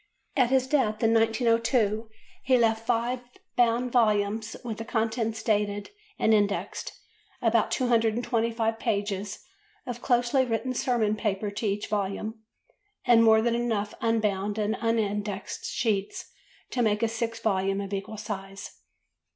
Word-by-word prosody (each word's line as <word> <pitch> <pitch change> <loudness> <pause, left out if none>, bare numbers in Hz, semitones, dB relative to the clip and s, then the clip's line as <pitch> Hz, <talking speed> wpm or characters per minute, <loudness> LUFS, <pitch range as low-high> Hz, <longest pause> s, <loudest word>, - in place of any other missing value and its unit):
At 255 -4 +3
his 260 -1 +3
death, 250 -6 +1
in 225 0 +4
1902, 225 -1 +2 0.3
he 255 -1 +4
left 225 -1 +1
five 240 +2 +1 0.4
bound 240 +1 +2
volumes, 215 -1 +1
with 225 -3 -5
the - - -3
contents 225 -1 -1
dated 205 -2 0 0.3
and 220 - +3
indexed, 205 -1 0 0.5
about 230 -1 +2
225 230 -1 +1
pages 205 -3 -2 0.4
of 245 -2 -5
closely 245 +1 +2
written 255 +1 -1
sermon 235 -4 +1
paper 210 -1 -2
to 215 +2 -3
each 200 +1 -1
volume, 210 +2 -3 0.6
and 235 -2 +6
more 220 -1 +6
than 235 0 +2
enough 225 -3 -1
unbound 210 -3 0
and 210 0 0
unindexed 210 -3 -2
sheets 210 -4 -2 0.4
to 250 - 0
made 210 -1 +1
a - - +4
sixth 230 0 -3
volume 195 -2 +1
of 200 0 -5
equal 200 +3 -4
size. 195 -2 -7
225 Hz, 135 wpm, -27 LUFS, 210-235 Hz, 0.6 s, and